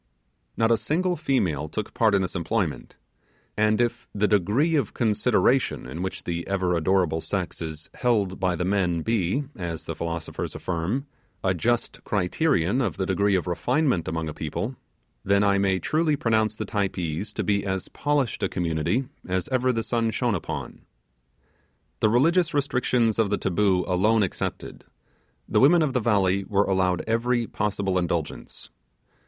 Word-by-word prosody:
Not 115 0 +3
a 115 - +5
single 175 - 0
female 90 - 0
took 105 +5 -4
part 110 -3 +3
in 95 - +2
this 90 - -4
employment: 90 -1 -2 0.6
and 110 +1 +2
if 120 -1 -1
the 105 +1 +2
degree 105 - +2
of 145 - 0
consideration 120 +3 +2
in 70 +7 -6
which 95 0 -4
the 85 -1 -3
ever 95 -2 0
adorable 85 -1 +1
sex 90 -2 -3
is 80 -1 -6
held 105 -6 0
by 90 -1 +1
the 90 - -2
men 90 -4 +1
be 115 +4 0
as 85 -3 -5
the 80 - -4
philosophers 85 0 -4
affirm 95 - -2 0.4
a 95 - +2
just 120 +7 -1
criterion 100 - +1
of 110 -7 -1
the 95 - -1
degree 100 +1 +2
of 90 - 0
refinement 120 - 0
among 80 0 -2
a 75 - -4
people, 105 - -4 0.5
then 100 +1 +3
I 100 -1 +3
may 95 -1 +2
truly 155 - +1
pronounce 110 -4 +1
the - - -4
Typees 95 -3 -2
to - - -2
be 100 -1 +1
as 95 -1 -2
polished 145 -4 -1
a - - +1
community 85 - -1 0.2
as 90 -1 -1
ever 130 -1 +2
the 115 -2 -1
sun 115 -1 0
shone 120 0 0
upon. 90 - -5 1.2
The 110 - +3
religious 165 +8 +3
restrictions 125 -5 +1
of 110 -3 +3
the - - +1
taboo 95 -1 +1
alone 105 +4 +3
excepted, 95 - -4 0.6
the - - +2
women 160 +5 +6
of 140 -4 0
the 125 - +2
valley 100 -4 +2
were 100 +1 +1
allowed 95 -2 +1
every 120 +1 +1
possible 100 -4 -1
indulgence. 85 -8 -4
100 Hz, 160 wpm, -25 LUFS, 90-120 Hz, 1.2 s, women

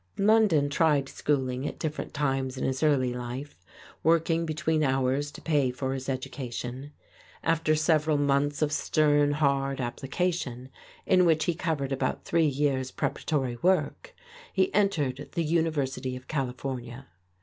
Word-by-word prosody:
London 200 -8 +4
tried 145 -1 +2
schooling 130 -2 -1
at - - -6
different 155 -1 -4
times 135 -2 -1
in - - -3
his 130 0 -1
early 135 -5 +2
life, 125 -3 -7 0.4
working 165 0 +2
between 155 0 0
hours 135 +1 +1
to - - -12
pay 145 -5 +2
for 130 +1 -3
his 130 0 -5
education. 130 0 -5 0.5
After 165 -1 +2
several 155 -1 +2
months 145 +1 +1
of 150 - 0
stern, 145 -1 +2
hard 140 -2 +1
application, 130 0 -2 0.4
in 185 -1 +4
which 160 -2 +3
he 175 - +1
covered 155 -5 -2
about 135 -1 -2
three 165 -2 +2
years' 135 -2 0
preparatory 130 -3 -2
work, 190 - 0 0.4
he 190 -1 +1
entered 150 -10 0
the 170 - 0
University 145 -6 -1
of 125 +1 -10
California. 130 -2 -4
145 Hz, 140 wpm, -28 LUFS, 130-160 Hz, 0.5 s, London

